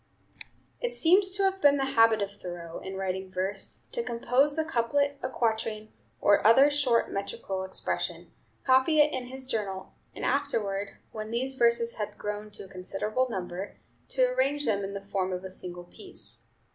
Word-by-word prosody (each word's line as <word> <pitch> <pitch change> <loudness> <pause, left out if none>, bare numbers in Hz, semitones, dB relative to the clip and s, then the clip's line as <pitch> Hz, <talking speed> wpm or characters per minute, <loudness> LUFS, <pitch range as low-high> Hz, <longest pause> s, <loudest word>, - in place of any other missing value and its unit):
It 485 0 -2
seems 380 +1 +5
to 395 +1 -1
have 385 0 +1
been 285 0 +6
the 270 - +1
habit 225 -2 +5
of 200 - -4
Thoreau, 175 -4 -7
in 190 0 -7
writing 190 0 -3
verse, 190 +2 -3
to 475 - 0
compose 270 - +1
a 315 - +1
couplet, 280 +1 +1
a 255 - -2
quatrain, 220 -3 -1 0.3
or 205 - +4
other 265 +7 +7
short 260 -5 +2
metrical 195 -1 -3
expression, 190 0 -3 0.3
copy 265 +4 +4
it 295 0 +5
in 255 -1 -3
his 260 +1 -7
journal, 200 -6 -3 0.2
and - - -4
afterward, 210 -8 -1
when 215 0 -6
these 255 +4 -1
verses 235 -2 +2
had 210 -1 -4
grown 210 0 -4
to 210 - -8
a - - -13
considerable 210 +7 -2
number, 185 -1 -5 0.3
to - - +3
arrange 290 - +1
them 200 -3 +1
in 195 +1 -4
the 200 0 -6
form 190 -2 -1
of 180 0 -3
a 190 - -6
single 180 -1 -6
piece. 375 - -8
225 Hz, 175 wpm, -28 LUFS, 195-275 Hz, 0.3 s, other